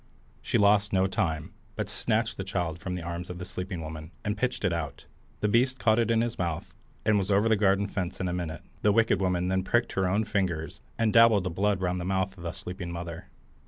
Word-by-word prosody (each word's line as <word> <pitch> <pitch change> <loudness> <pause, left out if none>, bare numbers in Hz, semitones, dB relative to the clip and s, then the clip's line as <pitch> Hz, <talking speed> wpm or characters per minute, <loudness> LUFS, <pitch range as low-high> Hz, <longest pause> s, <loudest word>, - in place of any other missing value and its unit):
She - - +1
lost 100 0 +4
no 95 -1 +3
time, 80 -5 -1 0.2
but - - -2
snatched - - 0
the 95 - -3
child 90 -4 -2
from 90 -1 -4
the 90 - -5
arms 85 +1 -5
of 90 - -5
the 90 - -6
sleeping 90 -1 -5
woman, 80 0 -7 0.2
and 105 0 0
pitched 125 +4 -1
it 85 - +2
out 80 -4 -4 0.4
The 105 - +2
beast 125 +4 +3
caught 110 -3 +3
it 115 -1 +2
in 115 -1 +3
his 120 0 -2
mouth, 85 -3 -3 0.3
and 105 -1 +4
was 95 0 -2
over 100 +2 +4
the 110 - +4
garden 100 -1 +3
fence 95 -3 -3
in 95 - -1
a 90 - -1
minute. 85 -3 -4 0.2
The 105 - +4
wicked 115 -1 +3
woman 90 -1 +1
then 95 0 +2
pricked 120 +5 +1
her 95 -1 +1
own 100 +4 +2
fingers, 90 -7 -2 0.2
and 115 -2 +2
dabbled 115 -4 +6
the 90 - -2
blood 100 +2 +1
round 90 0 0
the - - -4
mouth 95 0 0
of 90 - -13
the 85 -1 -3
sleeping 90 0 -6
mother. 85 -1 -6
95 Hz, 235 wpm, -28 LUFS, 90-105 Hz, 0.4 s, dabbled